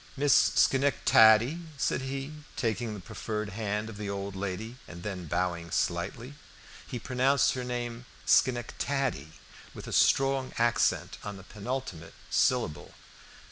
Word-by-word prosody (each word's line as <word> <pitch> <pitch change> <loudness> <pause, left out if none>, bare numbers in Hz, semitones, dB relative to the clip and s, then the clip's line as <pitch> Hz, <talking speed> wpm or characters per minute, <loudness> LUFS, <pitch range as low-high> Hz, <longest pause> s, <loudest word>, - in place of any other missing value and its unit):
"Miss 145 0 +4 0.2
Schenectady?" 130 0 +5 0.2
said 130 - 0
he, 135 +2 -4 0.2
taking 115 -1 -2
the - - -7
proffered 105 +2 -4
hand 105 +1 -3
of 110 -2 -8
the 105 -1 -4
old 100 0 -4
lady 100 +5 -4
and 85 -1 -10
then 95 -4 -5
bowing 85 0 -1
slightly. 120 - -2 0.5
He 125 - -5
pronounced 130 +3 +2
her 130 - -4
name 120 -1 -4 0.2
Schenectady, 125 - +1 0.4
with - - -8
a - - -6
strong 135 -1 +3
accent 95 -7 +1
on 105 -1 -6
the 95 - -12
penultimate 105 -6 -6 0.2
syllable. 115 -12 +1
115 Hz, 130 wpm, -29 LUFS, 100-130 Hz, 0.5 s, Schenectady